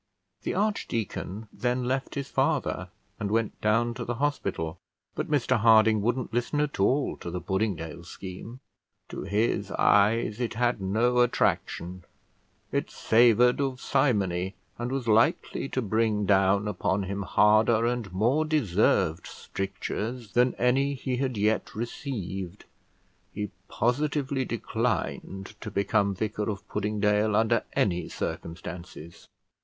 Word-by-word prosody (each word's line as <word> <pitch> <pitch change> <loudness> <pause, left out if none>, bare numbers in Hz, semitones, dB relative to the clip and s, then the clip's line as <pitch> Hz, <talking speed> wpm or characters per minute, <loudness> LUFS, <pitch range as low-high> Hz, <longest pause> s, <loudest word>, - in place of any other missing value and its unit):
The - - -3
archdeacon 115 - -2
then 125 +3 -1
left 130 +2 -2
his 140 -1 -3
father, - - 0 0.3
and 100 - -2
went 115 0 -1
down 115 +3 +2
to 120 - -5
the 120 +1 -3
hospital; 100 - -2 0.3
but - - -4
Mr 130 -4 +2
Harding 110 -1 +5
wouldn't 120 +2 -1
listen 120 +5 0
at 150 -5 -1
all 130 +8 +2
to - - -7
the 90 +1 -3
Puddingdale 90 -4 -2
scheme. 95 +8 -9 0.5
To - - -6
his 100 0 0
eyes 105 +3 +3
it 120 -2 -2
had 120 -2 +1
no 115 +6 +2
attraction; 90 -6 0 0.7
it - - -1
savoured 120 +3 +4
of 135 -2 -1
simony, 95 -9 +1 0.2
and 120 +1 -3
was 135 -3 -2
likely 115 +4 +2
to 130 - -1
bring 110 -1 +1
down 100 +1 +3
upon 100 0 0
him 100 +1 -3
harder 110 +3 +4
and 120 -5 -1
more 120 +11 +2
deserved 100 - +1
strictures 105 +4 -5
than 125 +1 +3
any 135 +3 +2
he 130 -1 -3
had 130 -3 -1
yet 105 +2 0
received: 100 - -5 0.7
he 105 -1 -4 0.2
positively 135 +2 0
declined 110 -4 -2
to 105 - -5
become 100 0 +1
vicar 105 +1 -2
of 100 -2 -5
Puddingdale 105 0 +1
under 115 +2 +3
any 90 -3 +1
circumstances. 85 -1 -7
110 Hz, 130 wpm, -27 LUFS, 100-125 Hz, 0.7 s, Harding